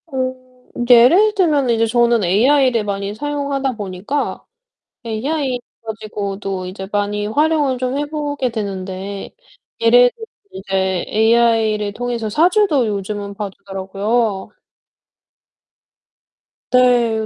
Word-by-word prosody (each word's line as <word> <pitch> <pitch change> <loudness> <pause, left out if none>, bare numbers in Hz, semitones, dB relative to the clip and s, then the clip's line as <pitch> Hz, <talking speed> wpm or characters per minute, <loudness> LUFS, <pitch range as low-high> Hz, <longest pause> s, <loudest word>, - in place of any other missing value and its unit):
어 260 -3 -2 0.5
이제 240 0 +6
예를 400 - +5
들면은 295 -10 +2
이제 225 0 +2
저는 235 -1 +2
AI를 240 +5 +3
많이 200 0 -3
사용하다 280 0 -2
보니까 205 +6 -4 0.6
AI 255 +3 -2 0.3
가지고도 200 -3 -5
이제 190 +1 -7
많이 205 0 -1
활용을 290 +1 +1 0.2
해 290 - -1
보게 290 -3 -3
되는데 195 -2 -5 0.5
예를 245 +2 +5
들면 450 - -10 0.3
이제 190 -1 -2
AI를 220 -2 +2
통해서 240 -1 -3
사주도 325 - +3
요즘은 205 0 -4
봐 205 0 -5
주더라고요. 195 +2 -2 2.2
네. 240 -3 +3
225 Hz, 235 characters per minute, -18 LUFS, 200-265 Hz, 2.2 s, 이제